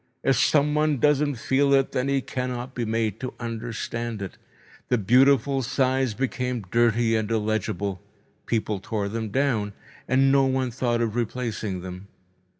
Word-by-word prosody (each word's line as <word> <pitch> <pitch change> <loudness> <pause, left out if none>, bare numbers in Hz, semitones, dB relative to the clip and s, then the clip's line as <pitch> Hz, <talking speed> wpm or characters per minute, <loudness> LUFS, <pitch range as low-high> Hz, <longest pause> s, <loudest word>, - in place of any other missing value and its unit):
If 135 - +3
someone 150 +3 +3
doesn't 145 +1 +2
feel 140 +4 +2
it, 135 -1 +2
then 125 +1 -1
he 140 -1 +1
cannot 125 0 -4
be 120 -2 -2
made 110 -2 -1
to 130 -1 -5
understand 115 -1 -4
it. 95 - -7 0.5
The 125 - +3
beautiful 135 +5 +4
signs 130 -1 0
became 125 -3 -2
dirty 115 -1 +3
and 110 -1 -1
illegible. 105 -4 -1 0.5
People 110 -3 -1
tore 100 +1 -3
them 110 0 -3
down, 110 -4 0 0.3
and 135 +1 +4
no 135 -1 +4
one 130 -1 0
thought 120 -1 0
of 115 -2 -1
replacing 115 -5 -2
them. 90 +2 -8
120 Hz, 150 wpm, -25 LUFS, 110-135 Hz, 0.5 s, beautiful